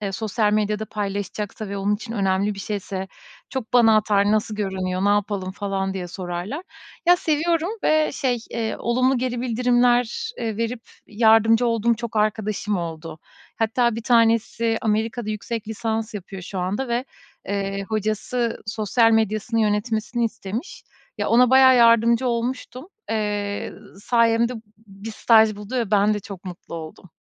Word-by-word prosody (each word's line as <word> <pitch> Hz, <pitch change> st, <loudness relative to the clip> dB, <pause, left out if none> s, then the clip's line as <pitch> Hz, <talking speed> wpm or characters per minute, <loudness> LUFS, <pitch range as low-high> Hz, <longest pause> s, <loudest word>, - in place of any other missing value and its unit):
e 200 Hz, -2 st, -3 dB
sosyal 210 Hz, +1 st, 0 dB
medyada 210 Hz, 0 st, 0 dB
paylaşacaksa 205 Hz, 0 st, -4 dB
ve 200 Hz, -, -4 dB
onun 200 Hz, +1 st, +1 dB
için 225 Hz, +2 st, -7 dB
önemli 200 Hz, 0 st, 0 dB
bir -, -, -11 dB
şeyse 190 Hz, -1 st, -4 dB, 0.4 s
çok 250 Hz, -4 st, -5 dB
bana 225 Hz, -3 st, +6 dB
atar, 205 Hz, -1 st, +2 dB
"Nasıl 215 Hz, 0 st, 0 dB
görünüyor, 190 Hz, -2 st, -2 dB
ne -, -, +3 dB
yapalım?" 205 Hz, -2 st, 0 dB
falan 195 Hz, -1 st, -3 dB
diye 180 Hz, -2 st, -4 dB
sorarlar. 180 Hz, -, -5 dB, 0.4 s
Ya, 355 Hz, 0 st, +7 dB
seviyorum 330 Hz, +2 st, 0 dB
ve, 310 Hz, 0 st, +3 dB
şey, 255 Hz, -5 st, 0 dB
eee, 225 Hz, -1 st, -2 dB
olumlu 255 Hz, +2 st, +1 dB
geri 245 Hz, -1 st, -2 dB
bildirimler, 245 Hz, -, +1 dB
eee, 220 Hz, -3 st, -3 dB
verip 230 Hz, +1 st, -3 dB, 0.2 s
yardımcı 225 Hz, +2 st, +4 dB
olduğum 230 Hz, 0 st, +2 dB
çok 230 Hz, -1 st, -6 dB
arkadaşım 210 Hz, -1 st, 0 dB
oldu. 165 Hz, -2 st, -6 dB, 0.4 s
Hatta, 230 Hz, +1 st, +1 dB
1 230 Hz, -, -5 dB
tanesi 230 Hz, -1 st, +2 dB
Amerika'da 220 Hz, +1 st, -1 dB
yüksek 215 Hz, +1 st, -5 dB
lisans 220 Hz, 0 st, -3 dB
yapıyor 195 Hz, -1 st, -7 dB
şu 190 Hz, +1 st, -6 dB
anda 200 Hz, +9 st, -2 dB
ve, 240 Hz, +2 st, -1 dB, 0.4 s
eee, 195 Hz, 0 st, -2 dB
hocası 220 Hz, +3 st, -2 dB
sosyal 225 Hz, +2 st, +2 dB
medyasını 220 Hz, +1 st, +1 dB
yönetmesini 220 Hz, +2 st, 0 dB
istemiş. 225 Hz, -, -5 dB, 0.4 s
Ya, -, -, -1 dB
ona 245 Hz, +1 st, +5 dB
bayağı 260 Hz, -1 st, +7 dB
yardımcı 235 Hz, +1 st, +5 dB
olmuştum. 250 Hz, +4 st, -3 dB, 0.2 s
Eee, 205 Hz, -2 st, -2 dB, 0.3 s
sayemde 235 Hz, +1 st, +2 dB
b -, -, -9 dB, 0.3 s
bir 195 Hz, +3 st, -9 dB
staj 220 Hz, -1 st, +4 dB
buldu 210 Hz, +5 st, -6 dB
ve 230 Hz, -4 st, -1 dB
ben 210 Hz, +1 st, +3 dB
de 205 Hz, -, -3 dB
çok 195 Hz, -1 st, -10 dB
mutlu 180 Hz, -2 st, -9 dB
oldum. 160 Hz, +2 st, -9 dB
220 Hz, 150 wpm, -23 LUFS, 200-235 Hz, 0.4 s, Ya